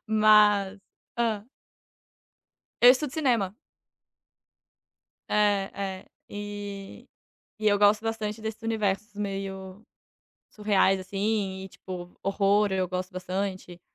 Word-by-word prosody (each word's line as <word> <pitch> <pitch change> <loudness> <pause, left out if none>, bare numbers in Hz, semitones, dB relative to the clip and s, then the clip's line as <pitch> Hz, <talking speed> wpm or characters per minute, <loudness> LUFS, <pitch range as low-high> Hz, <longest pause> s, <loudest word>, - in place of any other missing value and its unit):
Mas, 210 -2 +5 0.4
hã 220 -3 0 1.4
Eu 245 - +10
estudo 265 +1 +1
cinema. 235 -10 +1 1.7
É. 205 -2 +2
É. 195 -1 -5 0.2
E 205 -1 -7 0.5
e 215 0 +2
eu 205 - +3
gosto 210 +2 +4
bastante 225 -1 -3
desses 220 +1 -5
universos 210 -2 -1
meio 195 -1 -5 0.7
surreais, 200 -2 +2
assim. 195 0 -2
E, - - -8
tipo, 180 -1 -9
horror, 200 +1 +2
eu 185 -1 +1
gosto 185 0 -3
bastante. 185 -1 -4
205 Hz, 100 wpm, -27 LUFS, 190-215 Hz, 1.7 s, Eu